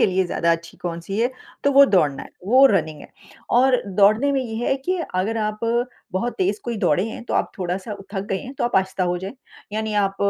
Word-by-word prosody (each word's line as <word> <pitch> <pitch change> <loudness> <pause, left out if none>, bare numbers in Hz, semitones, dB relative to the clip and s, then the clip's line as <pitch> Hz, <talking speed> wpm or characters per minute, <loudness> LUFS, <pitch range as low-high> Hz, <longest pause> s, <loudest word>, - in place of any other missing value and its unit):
के - - +5
लिए 190 0 +1
ज़्यादा 170 -1 +1
अच्छी 165 0 -5
कौन-सी 175 +4 -4
है 245 +2 +2 0.3
तो 280 - +4
वो 280 +1 +8
दौड़ना 145 -6 +2
है, - - -12 0.2
वो 255 +5 +6
रनिंग 155 -4 -3
है - - -12 0.5
और 260 -1 +4 0.2
दौड़ने 215 +8 +4
में 270 - +1
ये 225 -3 -5
है 270 - +2
कि 370 0 +1 0.2
अगर 205 +5 0
आप 215 0 -4 0.5
बहुत 235 +6 -2
तेज़ 385 +2 0
कोई 235 -1 -3
दौड़े 175 +6 +2
हैं, 235 - -8
तो - - -3
आप - - +1
थोड़ा-सा 185 +3 -3 0.2
थक 195 - -2
गए 190 - 0
हैं 260 +2 -9
तो - - -2
आप 240 - +1
आहिस्ता 190 -1 +1
हो 180 0 0
जाएँ, 190 +7 -6 0.4
यानी 220 0 -2
आप 195 0 -7
200 Hz, 225 wpm, -22 LUFS, 180-245 Hz, 0.5 s, वो